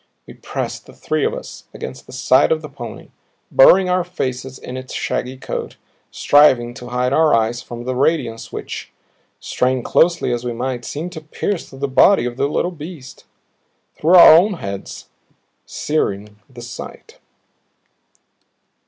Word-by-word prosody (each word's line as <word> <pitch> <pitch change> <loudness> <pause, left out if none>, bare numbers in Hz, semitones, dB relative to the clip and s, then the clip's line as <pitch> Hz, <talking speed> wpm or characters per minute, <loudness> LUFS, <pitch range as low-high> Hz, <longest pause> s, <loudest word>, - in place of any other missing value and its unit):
We - - -12
pressed, - - -6
the - - -14
three - - -2
of 460 +2 -1
us, - - -10
against - - -8
the - - -12
side - - +3
of 480 - 0
the - - -7
pony, - - -9 0.4
burying 195 - +6
our 180 0 +1
faces 130 -7 -5
in 125 - -8
its 130 0 -7
shaggy 130 +1 -3
coat, - - -5 0.3
striving 130 -5 +4
to 125 -1 -10
hide 125 +1 -1
our 160 -3 +4
eyes 115 +1 0
from 120 -1 -8
the 130 +1 -3
radiance 130 -5 -1
which, - - -7 0.5
strain 125 -1 -1
closely 170 -6 +2
as 120 0 -3
we 120 -1 -3
might, 125 +1 -4
seemed 165 +5 -5
to 160 -3 -8
pierce 165 +4 -4
through 135 - -13
the 140 +1 -2
body 140 +5 +4
of 120 -1 -4
the 140 +2 0
little 175 +4 -1
beast, 155 -4 -11 0.7
through 170 +4 +3
our 175 - +10
own 195 +6 +4
heads, 100 - -7 0.6
searing 105 -9 -2
the 125 -2 -11
sight. 120 -1 -10
130 Hz, 160 wpm, -19 LUFS, 125-165 Hz, 0.7 s, our